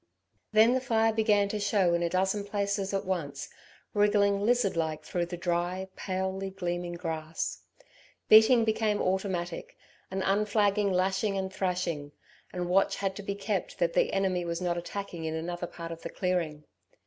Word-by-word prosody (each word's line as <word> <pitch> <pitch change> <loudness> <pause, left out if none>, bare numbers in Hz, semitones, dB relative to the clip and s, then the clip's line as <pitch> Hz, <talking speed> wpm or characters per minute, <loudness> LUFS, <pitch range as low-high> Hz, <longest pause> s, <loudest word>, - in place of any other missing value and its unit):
Then 220 +3 +6
the 260 - +1
fire 225 -3 +2
began 210 -2 +3
to 210 - -2
show 200 -3 +2
in 170 - +1
a 170 - +1
dozen 190 +3 0
places 200 -1 -1
at 195 -1 -1
once, 150 -7 -3 0.4
wriggling 205 -1 +3
lizard 240 -4 +2
like 160 -2 -2
through 175 -1 -2
the 175 0 -5
dry, 175 +2 -1
palely 190 0 -3
gleaming 175 -2 -3
grass. 160 -2 -4 0.7
Beating 225 +2 +7
became 215 -1 +1
automatic, 185 -2 -2 0.3
an 190 0 -2
unflagging 205 0 +2
lashing 190 +2 +1
and 190 0 -3
thrashing, 175 -6 -2 0.4
and 180 -1 -3
watch 190 +2 +3
had 195 -1 -2
to - - -5
be 200 0 -3
kept 200 -1 -3
that - - +1
the - - +2
enemy 190 -2 0
was 170 -1 -3
not 175 -1 0
attacking 175 -1 -5
in 160 0 -2
another 175 +2 -4
part 170 -1 -8
of 165 0 -7
the - - -5
clearing. 170 -5 -2
190 Hz, 165 wpm, -29 LUFS, 175-205 Hz, 0.7 s, Beating